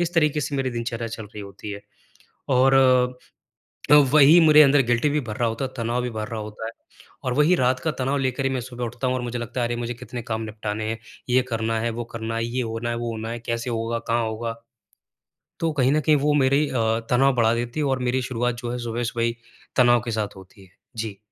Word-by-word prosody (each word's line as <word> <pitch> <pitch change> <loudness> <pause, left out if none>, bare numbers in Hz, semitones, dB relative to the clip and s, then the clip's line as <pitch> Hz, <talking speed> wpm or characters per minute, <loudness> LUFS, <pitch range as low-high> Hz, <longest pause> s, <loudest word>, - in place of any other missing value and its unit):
इस 175 0 0
तरीके 150 -2 +2
से 140 0 -3
मेरी 130 -1 -1
दिनचर्या 115 -1 -3
चल 110 - -6
रही 105 0 -10
होती 100 +1 -9
है। 100 0 -6 0.8
और 130 +1 +5 1.2
अ, - - +10 0.2
वही 150 +3 +8
मेरे 155 0 +8
अंदर 140 0 +5
गिल्टी 120 +5 +2
भी 150 - +1
भर 105 - -4
रहा 120 - +1
होता 115 +4 -3
है, 130 - -6
तनाव 120 +2 -1
भी 125 - -2
भर 110 -1 -4
रहा 115 -2 -5
होता 105 +1 -7
है। 115 - -4 0.5
और 125 - -1
वही 150 +6 +4
रात 130 -1 +1
का 155 +5 -1
तनाव 135 +2 0
लेकर 130 0 -1
ही 135 - +2
मैं 130 -2 -1
सुबह 125 0 -5
उठता 120 +3 -3
हूँ 130 - +1
और 125 - -2
मुझे 120 0 -4
लगता 120 +1 -4
है 120 - +1
अरे! 120 - -2
मुझे 120 0 -3
कितने 120 +1 -7
काम 110 -1 -3
निपटाने 110 0 -4
हैं, 110 0 -3 0.3
ये 125 +1 +4
करना 115 0 -1
है, 115 +1 -1
वो 120 +1 -4
करना 115 0 -3
है, 115 0 -1
ये 125 +2 -2
होना 115 0 -3
है, 115 - -1
वो 120 0 -3
होना 110 0 -5
है, 120 +1 -4
कैसे 115 +1 -3
होगा, 115 0 -2
कहाँ 115 0 0
होगा? 115 +1 -4 1.0
तो 165 -1 0
कहीं 130 0 +3
न 150 - +3
कहीं 155 0 +4
वो 150 - +4
मेरी 140 +3 +3
अ, - - -6 0.4
तनाव 135 +2 +4
बढ़ा 115 -2 +3
देती 120 +4 -3
है 150 - +1
और 135 -2 0
मेरी 130 +1 +1
शुरुआत 125 -1 -1
जो 120 - -3
है 125 - -3
सुबह-सुबह 120 0 -2
ही 115 0 0 0.4
तनाव 120 -1 +5
के 115 - -3
साथ 105 -2 -2
होती 95 +1 -15
है। - - -22 0.3
जी। 110 -3 -4
120 Hz, 245 wpm, -24 LUFS, 115-130 Hz, 1.2 s, अ